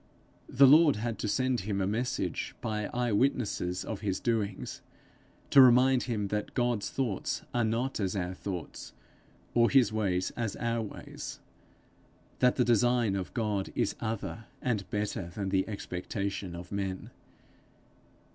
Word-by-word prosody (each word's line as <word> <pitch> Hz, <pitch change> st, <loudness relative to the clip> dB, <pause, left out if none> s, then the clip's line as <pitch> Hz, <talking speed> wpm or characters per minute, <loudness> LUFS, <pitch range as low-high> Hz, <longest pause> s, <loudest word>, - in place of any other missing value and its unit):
The 140 Hz, -, +6 dB
Lord 150 Hz, +1 st, +7 dB
had 115 Hz, +1 st, -3 dB
to -, -, -2 dB
send 130 Hz, +3 st, +1 dB
him 100 Hz, +1 st, -2 dB
a 95 Hz, -, +1 dB
message, 115 Hz, +6 st, -2 dB
by 105 Hz, -1 st, -2 dB
eye 120 Hz, -1 st, -1 dB
witnesses 105 Hz, -6 st, 0 dB
of 110 Hz, -, -4 dB
his 95 Hz, -3 st, -1 dB
doings, 105 Hz, -4 st, -2 dB, 0.7 s
to 140 Hz, -, +9 dB
remind 130 Hz, +1 st, +6 dB
him 105 Hz, -4 st, -1 dB
that 105 Hz, 0 st, -3 dB
God's 120 Hz, -4 st, 0 dB
thoughts 120 Hz, -8 st, -2 dB
are 120 Hz, -, +2 dB
not 115 Hz, +4 st, -1 dB
as 95 Hz, -1 st, -1 dB
our 90 Hz, -1 st, -2 dB
thoughts, 90 Hz, -2 st, -6 dB, 0.6 s
or 115 Hz, 0 st, +4 dB
his 125 Hz, -6 st, +4 dB
ways 95 Hz, -4 st, 0 dB
as 115 Hz, -4 st, -3 dB
our 115 Hz, 0 st, -1 dB
ways 105 Hz, -, -7 dB, 1.0 s
that 125 Hz, 0 st, +4 dB
the 125 Hz, -, +2 dB
design 120 Hz, -2 st, +3 dB
of 95 Hz, -2 st, -4 dB
God 105 Hz, -5 st, -1 dB
is -, -, +1 dB
other 115 Hz, 0 st, -4 dB
and 110 Hz, -7 st, -2 dB
better 105 Hz, -4 st, -2 dB
than 100 Hz, -2 st, -2 dB
the 95 Hz, -1 st, +1 dB
expectation 100 Hz, -2 st, -4 dB
of 85 Hz, 0 st, -9 dB
men. 95 Hz, -2 st, -3 dB
110 Hz, 145 wpm, -30 LUFS, 100-120 Hz, 1.0 s, to